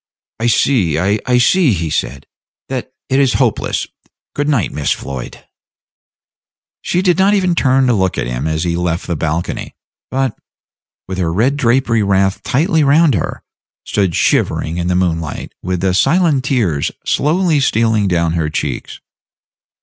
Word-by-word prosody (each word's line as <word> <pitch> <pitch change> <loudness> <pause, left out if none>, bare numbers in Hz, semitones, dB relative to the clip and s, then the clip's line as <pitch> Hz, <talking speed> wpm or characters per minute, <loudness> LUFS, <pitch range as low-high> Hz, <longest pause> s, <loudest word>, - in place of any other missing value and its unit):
"I 115 - 0
see 110 - +2
I 105 +8 +1
see," 145 - +3
he 80 -4 -2
said, 70 -3 -3 0.4
"that 130 -1 -4 0.2
it 135 +1 +1
is 135 -3 +3
hopeless. 120 -6 0 0.5
Good 145 +1 -1
night, 130 - +1
Miss 75 -2 -2
Floyd." 65 -3 -5 1.4
She 180 +1 -1
did 180 -1 +2
not 200 +2 +4
even 185 -3 +1
turn 135 -4 +2
to 125 - +3
look 95 -4 0
at - - -1
him - - -3
as 80 0 -1
he 85 -1 -1
left 85 0 -2
the 85 - -2
balcony; 80 +2 -3 0.3
but, 130 -3 -1 0.7
with 95 0 -5
her 85 -3 0
red 120 +11 +1
drapery 120 -3 +2
wrapped 95 -1 +1
tightly 160 +3 +1
round 145 +1 +4
her, 90 - -3 0.4
stood 95 -5 0
shivering 80 +2 +1
in 85 0 -2
the 90 - +1
moonlight, 85 -4 -2
with 90 -1 -3
the 95 -1 +1
silent 145 - +2
tears 100 - 0
slowly 160 0 +1
stealing 110 -5 +2
down 85 -3 +1
her 80 -2 -1
cheeks. - - -4
110 Hz, 155 wpm, -16 LUFS, 85-135 Hz, 1.4 s, not